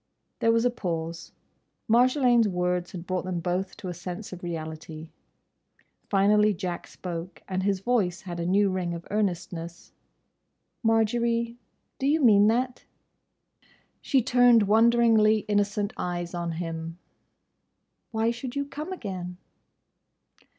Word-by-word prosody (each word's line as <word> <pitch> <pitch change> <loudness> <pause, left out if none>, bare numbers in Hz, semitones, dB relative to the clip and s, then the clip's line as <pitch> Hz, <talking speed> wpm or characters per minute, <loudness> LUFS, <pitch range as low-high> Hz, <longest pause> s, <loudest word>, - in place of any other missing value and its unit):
There 230 - +3
was 230 +1 +2
a 245 - +3
pause. 170 -6 -4 0.6
Marjolaine's 245 0 +4
words 180 -1 -1
had 175 -2 -7
brought 185 0 -2
them 180 -1 -3
both 180 +3 -2
to 190 - -7
a 180 - -3
sense 180 +4 -7
of 180 - -9
reality. 160 -1 -6 1.0
Finally 210 +1 +4
Jack 180 -2 -4
spoke, 175 0 -7
and 185 -1 -2
his 195 -1 0
voice 195 -6 0
had 175 -2 -6
a 170 - -2
new 195 +1 +3
ring 180 -2 -2
of 170 - -8
earnestness. 175 -4 -3 0.9
"Marjory—do 235 +3 -1
you 305 +3 +3
mean 210 -7 +6
that?" 250 +3 0 1.2
She 265 -3 +2
turned 245 -2 +5
wonderingly 220 0 +4
innocent 205 0 0
eyes 175 -1 -4
on 170 -1 -3
him. 165 0 -5 1.1
"Why 225 0 +1
should 245 +2 -6
you 280 0 -1
come 300 +5 -7
again?" 185 - -6
200 Hz, 125 wpm, -26 LUFS, 175-230 Hz, 1.2 s, mean